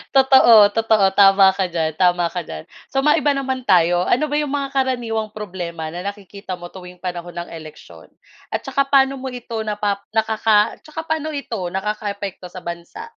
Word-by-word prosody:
totoo, 265 Hz, -3 st, +6 dB, 0.2 s
totoo, 220 Hz, -2 st, +2 dB
tama 195 Hz, -1 st, +6 dB
ka 190 Hz, -1 st, -1 dB
diyan 165 Hz, -2 st, -1 dB
tama 175 Hz, -1 st, +3 dB
ka 180 Hz, -2 st, -4 dB
diyan. 80 Hz, 0 st, -8 dB, 0.3 s
So 270 Hz, 0 st, 0 dB
maiba 295 Hz, -1 st, +3 dB
naman 265 Hz, -2 st, -3 dB
tayo, 175 Hz, 0 st, +4 dB
ano 300 Hz, +5 st, +2 dB
ba -, -, 0 dB
yung 295 Hz, -2 st, -2 dB
mga 275 Hz, -1 st, -2 dB
karaniwang 235 Hz, -5 st, -1 dB
problema 175 Hz, -6 st, -6 dB
na 175 Hz, +2 st, -6 dB
nakikita 200 Hz, -2 st, -7 dB
mo 175 Hz, 0 st, -10 dB
tuwing 180 Hz, -1 st, -12 dB
panahon 175 Hz, -1 st, -6 dB
ng -, -, -15 dB
eleksyon? 155 Hz, -2 st, -12 dB, 0.5 s
At -, -, -2 dB
tsaka 275 Hz, 0 st, 0 dB
paano 270 Hz, -1 st, +3 dB
mo 265 Hz, -, -6 dB
ito 235 Hz, -2 st, -6 dB
napap 205 Hz, -1 st, -2 dB
nakaka 220 Hz, -1 st, +2 dB
tsaka 315 Hz, +1 st, -7 dB
paano 315 Hz, -1 st, -3 dB
ito 235 Hz, -7 st, -5 dB
nakakaapekto 200 Hz, -2 st, -4 dB
sa 180 Hz, +1 st, -11 dB
bansa? 175 Hz, -, -8 dB
210 Hz, 175 wpm, -20 LUFS, 180-265 Hz, 0.5 s, totoo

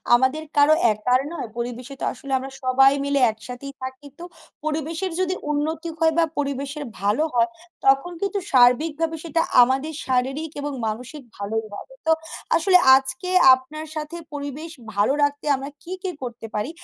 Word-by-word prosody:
আমাদের 260 Hz, +5 st, +1 dB
কারো 290 Hz, +2 st, +6 dB, 0.2 s
একার 250 Hz, +5 st, +1 dB
নয়। 245 Hz, -, -5 dB
পরিবেশে 245 Hz, +3 st, -5 dB
তো -, -, 0 dB
আসলে 275 Hz, -, -10 dB
আমরা 265 Hz, +1 st, -6 dB
সবাই 270 Hz, +1 st, +5 dB
মিলে 280 Hz, 0 st, +1 dB
একসাথেই 250 Hz, +5 st, -9 dB
থাকি। 260 Hz, +2 st, -7 dB
তো -, -, -8 dB, 0.4 s
পরিবেশের 320 Hz, +4 st, -2 dB
যদি 370 Hz, 0 st, 0 dB, 0.2 s
উন্নতি 315 Hz, +3 st, -2 dB
হয় 320 Hz, -1 st, +3 dB
বা, 335 Hz, -, +5 dB
পরিবেশের 280 Hz, +1 st, -3 dB, 0.2 s
ভালো 210 Hz, +9 st, +2 dB
হয়, 235 Hz, -1 st, +3 dB, 0.4 s
তখন 275 Hz, +6 st, +4 dB
কিন্তু 400 Hz, 0 st, -1 dB
সার্বিকভাবে 300 Hz, +6 st, +3 dB
সেটা 330 Hz, 0 st, 0 dB, 0.2 s
আমাদের 270 Hz, +5 st, +2 dB
শারীরিক 270 Hz, +5 st, -1 dB
এবং 290 Hz, 0 st, -3 dB, 0.2 s
মানসিক 250 Hz, +7 st, -5 dB, 0.2 s
ভালোই 215 Hz, +2 st, -3 dB
হবে। -, -, -9 dB
তো -, -, +5 dB, 0.4 s
আসলে 365 Hz, +2 st, +5 dB, 0.2 s
আজকে 265 Hz, +6 st, -1 dB, 0.2 s
আপনার 300 Hz, +5 st, -3 dB
সাথে 310 Hz, +2 st, -5 dB, 0.2 s
পরিবেশ 290 Hz, +3 st, -6 dB, 0.2 s
ভালো 205 Hz, +7 st, +3 dB
রাখতে 285 Hz, +1 st, 0 dB
আমরা 270 Hz, +2 st, -6 dB
কি, 355 Hz, -, -10 dB
কি 375 Hz, -, -1 dB
করতে 240 Hz, -2 st, -6 dB
পারি? 210 Hz, +7 st, -1 dB
280 Hz, 155 wpm, -23 LUFS, 255-315 Hz, 0.4 s, কারো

